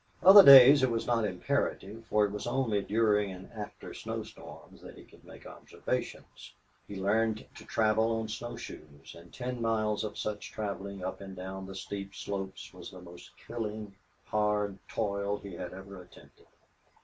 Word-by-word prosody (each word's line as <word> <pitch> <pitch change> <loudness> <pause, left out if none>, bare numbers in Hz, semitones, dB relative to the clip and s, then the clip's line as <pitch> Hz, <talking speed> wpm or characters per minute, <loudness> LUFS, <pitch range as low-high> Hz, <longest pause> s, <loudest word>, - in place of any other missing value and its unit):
Other 195 +2 +11
days 140 0 +10
it 130 - +3
was 115 -1 -2
not 115 -2 +1
imperative, 105 +1 -2
for 105 0 +3
it 100 - -4
was 105 +3 -5
only 120 -5 0
during 105 -1 +1
and 95 0 -11
after 105 -3 -8
snow - - -5
storms - - -13
that - - -12
he - - -13
could - - -20
make - - -14
observations. - - -6 0.3
He 100 - -8
learned 110 +3 0
to - - -13
travel 110 +1 +1
on 110 - -4
snow 120 +2 -6
shoes, 75 -10 -11
and 85 0 -15
ten 125 -1 -5
miles 110 -2 0
of 105 - -5
such 105 -1 -4
traveling 100 -2 -5
up 95 +2 -5
and 95 -1 -9
down 95 +1 -7
the 95 - -9
steep 100 +1 -6
slopes 95 -1 -6
was - - -10
the 95 - -12
most 90 -1 -14
killing 110 -3 -5 0.3
hard 105 -2 0
toil 100 -1 -2
he 100 -2 -10
had 90 0 -6
ever 95 0 -10
attempted. - - -19
105 Hz, 175 wpm, -30 LUFS, 95-115 Hz, 0.3 s, Other